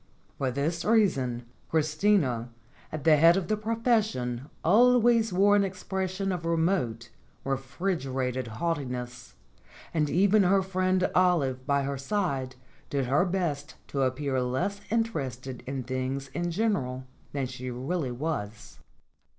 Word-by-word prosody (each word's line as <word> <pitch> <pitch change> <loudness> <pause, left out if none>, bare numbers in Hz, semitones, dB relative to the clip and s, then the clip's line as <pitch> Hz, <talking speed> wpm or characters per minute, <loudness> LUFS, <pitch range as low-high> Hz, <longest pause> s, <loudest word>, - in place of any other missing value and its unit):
For 135 - +1
this 150 +6 -1
reason 135 - +2 0.2
Christina 155 - +1 0.4
at 155 -2 -5
the 160 -2 +6
head 165 +4 +6
of 190 0 -3
the 215 - +3
profession 215 - 0
always 235 +3 +5
wore 200 +3 +4
an 205 - +4
expression 190 0 -3
of 180 -2 -3
remote, 165 - 0 0.3
re 135 0 +1
frigerated 135 -4 -2
haughtiness; 125 -2 -4 0.6
and 150 -3 +1
even 200 +5 +4
her 195 +1 +3
friend 185 0 +1
Olive 140 -8 +2
by 140 -1 +2
her 140 0 -3
side 140 -6 -2 0.3
did 140 -2 0
her 140 +8 +2
best 165 -6 -2
to 140 - -1
appear 130 0 0
less 130 +12 -1
interested 135 - -2
in 135 -1 -3
things 130 +2 -3
in 175 +5 -2
general 165 - -1 0.3
than 140 -2 -2
she 125 0 -6
really 130 +4 -2
was. 120 -7 -5
150 Hz, 130 wpm, -28 LUFS, 130-190 Hz, 0.6 s, the